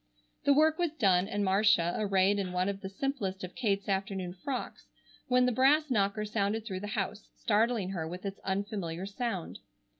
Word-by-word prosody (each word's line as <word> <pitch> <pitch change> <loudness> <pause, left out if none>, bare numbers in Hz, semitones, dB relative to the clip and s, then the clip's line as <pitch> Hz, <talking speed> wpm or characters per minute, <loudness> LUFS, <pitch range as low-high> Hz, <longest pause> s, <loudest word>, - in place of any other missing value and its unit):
The 285 - +6
work 315 +3 +4
was 345 -3 0
done, 195 - +3
and 205 -1 -1
Marcia 190 -3 +3
arrayed 200 -1 +2
in 185 -2 -2
one 180 +1 +1
of 200 0 -3
the 190 - -5
simplest 195 -4 -3
of 180 - -6
Kate's 200 -5 -1
afternoon 190 -2 -2
frocks, 250 +8 -5 0.4
when 250 0 +4
the 250 - +2
brass 280 +5 +3
knocker 205 -1 +1
sounded 210 +1 -1
through 190 -4 -4
the 205 - -5
house, 205 +1 -3
startling 220 -2 +1
her 165 -4 -3
with 180 +4 -7
its 195 0 -4
unfamiliar 190 -3 -3
sound. 200 -3 -4
200 Hz, 180 wpm, -30 LUFS, 190-230 Hz, 0.4 s, The